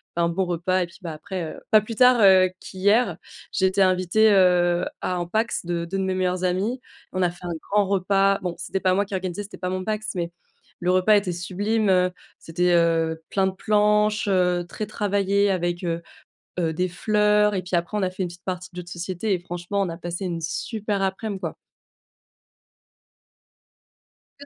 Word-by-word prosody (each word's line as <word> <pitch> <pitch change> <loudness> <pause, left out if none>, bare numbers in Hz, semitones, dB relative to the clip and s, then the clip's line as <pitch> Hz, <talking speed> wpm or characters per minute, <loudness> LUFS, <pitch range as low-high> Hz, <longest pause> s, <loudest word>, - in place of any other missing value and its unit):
un 170 0 +2
bon 190 +3 0
repas 180 +1 0
et - - -2
puis, 170 - -17
bah, 170 -3 -5
après, 175 +1 -6
heu, - - -11
pas 215 -1 +7
plus 225 +2 -7
tard, 250 +1 +6
heu, 190 -2 +6
qu'hier, 200 0 +1 0.3
j'ai 190 - +1
été 190 +1 +2
invitée, 185 +4 +4
heu, 180 -2 +4 0.2
à 185 - -1
un 175 -1 -2
PACS 220 +2 -1
de 170 -1 -2
2 195 +3 -4
de 190 - 0
mes 190 0 0
meilleurs 185 0 -1
amis. 200 +8 0 0.3
On 185 - -1
a 175 - +3
fait 175 0 -13
un 175 - -3 0.2
grand 205 -1 +3
repas. 195 0 +2
Bon, 180 -2 -3
c'était 185 +2 -3
pas 185 -1 +2
moi 200 - +2
qui 195 - -5
organisais, 185 +1 -3
c'était 200 - -11
pas 180 - -3
mon 185 0 -2
PACS, 215 0 -3
mais 170 -1 -2 0.5
le 180 +1 +1
repas 185 +3 +4
était 195 -3 -1
sublime. 200 +5 -1
Heu, 180 -1 +3 0.3
c'était, 175 +2 0
heu, 165 -1 +2
plein 195 -1 +2
de - - -1
planches, 210 +1 +2
heu, 180 -2 +2
très 215 - -4
travaillées 200 -1 +1
avec, 175 -1 -1
heu 170 -1 -2 0.6
heu, 165 -2 +1
des 180 +3 -1
fleurs 210 +2 +2
et 185 - -1
puis 180 0 -1
après 170 +5 -2
on 210 - 0
a 185 - +1
fait 185 - -5
une - - -3
petite 175 +1 -13
partie 185 -1 -4
de 180 - -10
jeu - - -4
de 175 - -15
société 180 +4 -3
et 185 - +2
franchement, 175 +3 -3
on 190 - -1
a 165 - -5
passé 175 +2 -5
une 170 -2 -3
super 205 +5 -3
aprèm, 195 +2 -2
quoi. - - -4 2.8
Est-ce 285 - -11
185 Hz, 205 wpm, -24 LUFS, 175-200 Hz, 2.8 s, pas